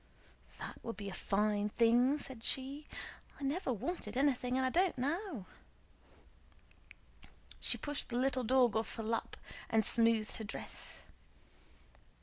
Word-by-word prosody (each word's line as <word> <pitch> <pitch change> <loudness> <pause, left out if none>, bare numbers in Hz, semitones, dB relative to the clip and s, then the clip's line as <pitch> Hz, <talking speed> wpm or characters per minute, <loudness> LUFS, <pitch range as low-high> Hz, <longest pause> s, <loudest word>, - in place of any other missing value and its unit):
"That - - -8
would 230 -3 -5
be 200 -1 -5
a - - -6
fine 210 +1 +1
thing!" 240 +5 +4
said 260 -5 -7
she. 275 +4 0 0.5
"I - - -7
never 275 +1 0
wanted 240 - -3
anything 255 -2 +2
and 260 - +2
I 260 - +1
don't 360 -1 +3
now." 290 - -2 2.1
She - - 0
pushed 290 -1 -3
the 240 - -1
little 260 0 +2
dog 245 -1 +4
off 220 0 -1
her 225 - -4
lap 230 +1 -2 0.3
and 220 -2 +3
smoothed 230 -1 +3
her 220 - -5
dress. 205 - -6
250 Hz, 135 wpm, -35 LUFS, 220-275 Hz, 2.1 s, thing